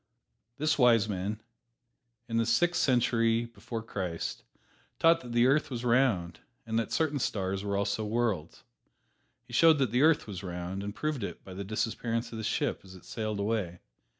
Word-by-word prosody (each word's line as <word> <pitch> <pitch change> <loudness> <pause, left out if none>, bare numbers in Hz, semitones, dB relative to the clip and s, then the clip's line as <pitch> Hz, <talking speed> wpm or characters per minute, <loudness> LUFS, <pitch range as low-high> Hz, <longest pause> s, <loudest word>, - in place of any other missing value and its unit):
This 155 +1 +1
wise 115 -4 +5
man, 105 +2 -3 0.8
in 115 -1 -1
the 115 - +2
Sixth 175 +9 +2
Century 115 -2 +2
before 115 -1 -7
Christ, 90 -6 -4 0.6
taught 165 +1 +4
that 120 - -9
the 120 +1 +4
earth 140 +4 +3
was 125 -2 -4
round, 115 -9 +2 0.3
and 115 0 0
that 115 - -3
certain 150 -3 +1
stars 95 -4 -1
were 100 -1 -1
also 100 +2 -1
worlds. 105 -7 -2 0.8
He - - -14
showed 165 -2 +6
that 130 -6 +1
the 125 +2 +2
earth 155 0 +4
was 100 -3 -6
round 90 +1 -5
and 100 +1 -5
proved 150 -6 -2
it - - -6
by 95 - -10
the 100 +2 -5
disappearance 115 +3 -2
of 115 - -6
the - - -4
ship - - -1
as 95 -1 -13
it 90 - -15
sailed 110 -2 -3
away. 100 -4 -1
115 Hz, 180 wpm, -30 LUFS, 100-125 Hz, 0.8 s, showed